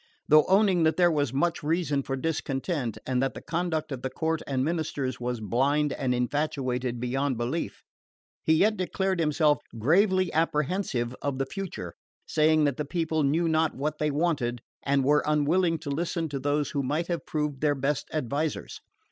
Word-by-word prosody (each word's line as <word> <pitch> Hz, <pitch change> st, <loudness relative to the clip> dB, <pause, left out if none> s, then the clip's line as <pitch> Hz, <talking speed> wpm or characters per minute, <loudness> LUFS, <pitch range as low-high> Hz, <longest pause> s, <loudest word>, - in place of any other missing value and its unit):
Though 155 Hz, 0 st, +6 dB
owning 190 Hz, -2 st, +4 dB
that 160 Hz, 0 st, +2 dB
there 175 Hz, -1 st, +5 dB
was 145 Hz, -5 st, 0 dB
much 170 Hz, +6 st, 0 dB
reason 155 Hz, -2 st, 0 dB
for 135 Hz, 0 st, -3 dB
discontent, 135 Hz, -, -2 dB
and 130 Hz, -1 st, 0 dB
that 135 Hz, 0 st, -1 dB
the -, -, -5 dB
conduct 165 Hz, -3 st, -2 dB
of 130 Hz, -2 st, -4 dB
the 130 Hz, -, -2 dB
court 160 Hz, +4 st, -1 dB
and 130 Hz, -1 st, 0 dB
ministers 145 Hz, -6 st, -2 dB
was 125 Hz, -1 st, -2 dB
blind 135 Hz, +7 st, +1 dB
and 130 Hz, -2 st, -1 dB
infatuated 125 Hz, -2 st, -1 dB
beyond 130 Hz, +2 st, -1 dB
belief, 125 Hz, +8 st, -3 dB, 0.6 s
he 160 Hz, -, +4 dB
yet 215 Hz, +6 st, +3 dB
declared 190 Hz, 0 st, -1 dB
himself 150 Hz, -1 st, +3 dB, 0.2 s
gravely 185 Hz, -, +3 dB
apprehensive 150 Hz, -5 st, 0 dB
of 140 Hz, -2 st, -2 dB
the 135 Hz, -, 0 dB
future, 165 Hz, -, -6 dB, 0.3 s
saying 155 Hz, 0 st, +3 dB
that 140 Hz, -3 st, +1 dB
the 150 Hz, -, -1 dB
people 160 Hz, +1 st, -1 dB
knew 155 Hz, +4 st, +2 dB
not 160 Hz, -1 st, +1 dB
what 150 Hz, +3 st, -3 dB
they 150 Hz, -, +1 dB
wanted, 140 Hz, -6 st, 0 dB, 0.2 s
and 140 Hz, -1 st, +1 dB
were 145 Hz, +2 st, +3 dB
unwilling 165 Hz, +3 st, +2 dB
to 155 Hz, -2 st, -6 dB
listen 165 Hz, +2 st, -1 dB
to 140 Hz, -1 st, -3 dB
those 145 Hz, +2 st, 0 dB
that 145 Hz, -, -1 dB
might 150 Hz, +5 st, -1 dB
have 170 Hz, -1 st, -4 dB
proved 150 Hz, -3 st, -2 dB
their 150 Hz, -1 st, +2 dB
best 140 Hz, +1 st, -1 dB
advisors. 150 Hz, +1 st, -2 dB
150 Hz, 175 wpm, -27 LUFS, 135-165 Hz, 0.6 s, Though